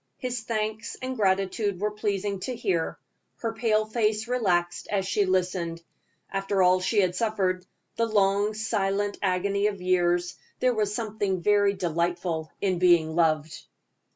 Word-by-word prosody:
His 250 -2 -3
thanks 220 0 -3
and 260 0 -4
gratitude 195 -1 0
were 210 +1 0
pleasing 205 -1 -2
to 250 +6 -4
hear. 185 -8 -1 0.4
Her 230 -1 -3
pale 220 -1 +1
face 215 0 0
relaxed 180 -8 0
as 195 -2 0
she 205 +1 +2
listened. 180 -2 -1 0.5
After 195 0 +1
all 180 +1 +5
she 195 +3 +2
had 180 -2 0
suffered, 185 -4 0 0.3
the 230 - +2
long, 205 0 +2
silent 205 -2 -1
agony 200 +2 +1
of 200 -2 -3
years 175 -1 +1 0.2
there 255 -1 +3
was 210 -3 0
something 205 -5 -2
very 205 0 +4
delightful 170 -2 -2
in 185 -3 +1
being 170 -3 +4
loved. 160 -2 +1
195 Hz, 145 wpm, -26 LUFS, 180-215 Hz, 0.5 s, all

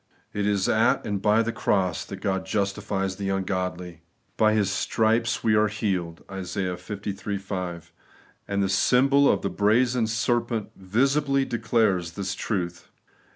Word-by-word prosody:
It 105 0 -1
is 100 -2 +1
at 110 +1 +2
and 100 -2 -2
by 105 +2 +3
the 115 - -2
cross 95 -6 0
that 95 -1 -8
God 95 -2 -1
justifies 100 -1 -2
the 100 -1 -3
ungodly. 90 -3 -3 0.2
' - - -43
By 110 0 +3
His 100 -3 +1
stripes 115 +3 +1
we 110 - +3
are 105 0 +4
healed 95 -6 -3
' - - -11
(Isa. 95 +1 -4
liiL 100 +2 -5
5); 90 -4 -5 0.5
and 100 0 0
the - - +1
symbol 135 +8 +4
of - - -1
the - - -1
brazen 115 +3 +2
serpent 115 -1 -1
visibly 135 +8 +1
declares 110 -8 0
this 100 +1 -3
truth. 90 -5 -3
100 Hz, 155 wpm, -25 LUFS, 95-110 Hz, 0.5 s, are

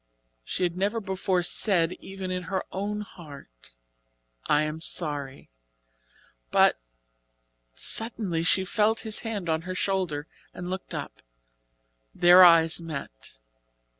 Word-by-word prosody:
She 180 - -4
had 175 -1 0
never 200 +5 -1
before 190 -2 -1
said, 175 -2 +3
even 190 -1 -7
in 180 0 -2
her 190 -1 -2
own 205 +2 -3
heart: 140 - -13 0.7
"I 150 +1 +3
am 155 +1 -4
sorry," 145 - -2 1.0
but - - +3 1.0
suddenly, 215 -7 +2
she 190 +3 +2
felt 215 +3 +1
his 220 -1 -2
hand 210 -6 -5
on 160 0 0
her 185 +2 -6
shoulder, 185 -7 -2 0.3
and 180 0 -6
looked 190 0 -6
up. - - -7 0.9
Their 180 +1 +7
eyes 165 -1 +5
met. 140 - -8
180 Hz, 120 wpm, -26 LUFS, 160-195 Hz, 1.0 s, Their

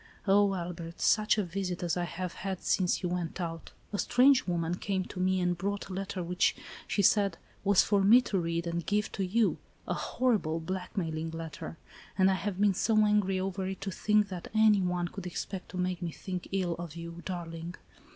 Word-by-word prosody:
"Oh, 200 0 +4
Albert, 170 -1 -6
such 215 0 +3
a 210 - +2
visit 180 0 -3
as 175 - 0
I 175 -1 -1
have 180 0 -5
had 190 -2 -5
since 185 0 +1
you 180 - 0
went 175 0 -3
out. 165 -2 -5 0.2
A 205 - -1
strange 260 -1 +4
woman 170 -1 0
came 190 0 -2
to 185 - -8
me, 185 0 +2
and 180 -1 +1
brought 200 +4 -3
a - - -5
letter 190 -1 -3
which, 180 +1 +2 0.3
she 200 - +1
said, 200 +1 +4 0.3
was 200 -1 +5
for 205 -1 +2
me 215 +6 +8
to 205 -5 -1
read 170 0 -1
and 170 0 -2
give 205 +5 0
to 195 - -2
you, 215 +4 +2
— - - -33
a - - 0
horrible, 210 -11 0
blackmail 180 -1 -3
ing 160 +1 -3
letter! 165 0 -7 0.4
And 190 0 +5
I - - +3
have 190 0 -3
been 205 -1 +4
so 220 +4 +1
angry 205 -3 +2
over 190 0 -2
it, 190 0 -4
to 195 - -3
think 210 +2 +2
that 180 -3 -6
any 215 -2 +5
one 180 -1 0
could 180 +1 -7
expect 185 +2 -5
to - - -7
make 180 0 -1
me 175 - -2
think 180 +2 -6
ill 185 -3 0
of 170 -2 -6
you, 170 0 -7
darling. 170 -1 -5
185 Hz, 210 wpm, -30 LUFS, 175-200 Hz, 0.4 s, me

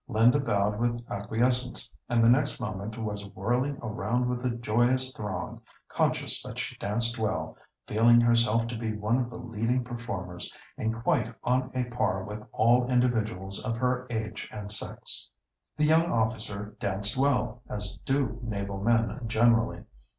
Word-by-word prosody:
Linda 120 +3 +4
bowed 105 -5 +1
with 120 0 -1
acquiescence, 120 +5 0
and 115 -1 +3
the - - +6
next 130 +4 +3
moment 105 -1 -4
was 105 -2 -4
whirling 125 +8 0
around 115 +3 -1
with 125 0 -2
the 125 - 0
joyous 120 +3 +1
throng, 105 -5 -5 0.3
conscious - - +1
that - - -8
she - - -3
danced 115 +3 -1
well, 110 -1 -1 0.3
feeling 120 +2 +5
herself 115 -1 +4
to 120 - -4
be 110 -1 -3
one 110 +4 +1
of 120 -2 -1
the 115 - -8
leading 120 +1 -1
performers, 115 -8 -5 0.2
and 110 +1 -1
quite 125 -9 +1
on 125 +1 +1
a 125 - +1
par 120 -6 -1
with 105 +2 -7
all 120 +3 +4
other 125 - -2
individuals 110 -6 +1
of 115 -2 -2
her 125 +1 0
age 110 -2 -4
and 105 -1 -6
sex. 105 - -1 0.5
The 150 - +3
young 165 +2 +4
officer 110 -2 -2
danced 100 +2 -1
well, 125 -3 +1
as 105 -1 -3
do 135 -4 0
naval 100 -3 -4
men 115 +3 +2
generally. 115 +1 +3
115 Hz, 160 wpm, -28 LUFS, 105-125 Hz, 0.5 s, the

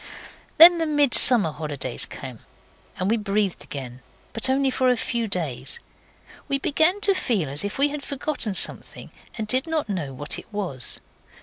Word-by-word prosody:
Then 340 +1 +9
the 325 - -1
Midsummer 255 - +4
holidays 140 -6 -1
came, 130 -3 -10 0.6
and 185 - -2
we 230 - +1
breathed 205 -2 -2
again 130 -3 -9 0.3
but 225 +3 +3
only 270 0 +1
for 255 0 +1
a 250 - +1
few 235 0 -3
days. 175 - 0 0.7
We 275 - 0
began 315 +8 +1
to 400 -1 +3
feel 220 - -2
as 145 +5 -5
if 205 - -5
we 285 +2 +3
had 295 0 -6
forgotten 275 -6 -3
something, - - -2 0.3
and 220 -2 -5
did 255 +6 0
not 315 -7 -3
know 170 -9 -4
what 145 +3 -4
it - - -16
was. 180 - +1
220 Hz, 170 wpm, -23 LUFS, -, 0.7 s, Then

